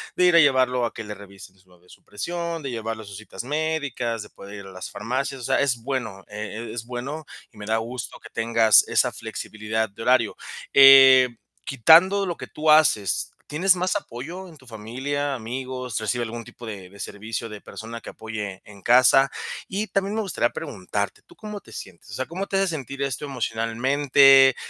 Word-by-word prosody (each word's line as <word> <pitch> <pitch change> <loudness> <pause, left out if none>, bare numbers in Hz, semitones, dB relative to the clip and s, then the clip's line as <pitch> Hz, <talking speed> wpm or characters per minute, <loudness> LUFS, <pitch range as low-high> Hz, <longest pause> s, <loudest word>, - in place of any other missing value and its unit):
de 180 - +3
ir 175 -1 +5
a - - +8
llevarlo 130 -4 +3
a - - -4
que 115 - -7
le 105 - -6
revisen 100 -1 -14
suave 90 -1 -25
su - - -18
presión, 170 +9 -4
de 135 - -4
llevarlo 115 -1 -5
a - - -13
sus 100 -1 -9
citas 110 +2 -8
médicas, 145 -6 -2
de 105 - -14
poder 100 +1 -12
ir 100 - -9
a 95 - -11
las 90 0 -7
farmacias. 130 +4 -3
O - - -9
sea - - +2
es 125 -5 0
bueno, 115 -7 -4
e 105 0 -9 0.3
e - - -8
es 115 -1 -5
bueno 135 +6 -6 0.3
y - - -20
me 105 - -8
da 110 0 +1
gusto 115 +2 -5
que - - -13
tengas 115 -1 +4
esa - - +2
flexibilidad 110 0 -4
de 100 - -12
horario. 120 -2 +2 0.4
Eh, 135 -2 +9 0.4
quitando 170 - +5
lo 175 -3 -3
que - - -9
tú 155 0 +1
haces, 130 - +3
¿tienes 185 +5 +2
más 185 +2 -1
apoyo 170 - -6
en 160 - -15
tu 130 - -20
familia, 130 +6 -3
amigos, 125 0 -5
recibes 120 +3 -1
algún 115 +1 -6
tipo 120 +1 -13
de 100 -5 -8
de 100 +2 -16
servicio 110 +3 -5
de 105 -2 -10
persona 115 +1 -9
que - - -9
apoye 105 -4 -6
en 100 -2 -15
casa? 130 +4 +5 0.4
Y 200 +3 -2
también 195 +1 -1
me 220 - 0
gustaría 180 - 0
preguntarte, 100 +2 -4
¿tú - - -18
cómo 210 -1 -7
te - - -17
sientes? 95 -1 -10
O 100 - -10
sea, 130 +4 -3
¿cómo 185 +6 -5
te 195 - -1
hace 195 -1 +2
sentir 140 -3 -5
esto 135 0 -3
emocionalmente? 135 +2 +4
125 Hz, 200 wpm, -24 LUFS, 110-145 Hz, 0.4 s, Eh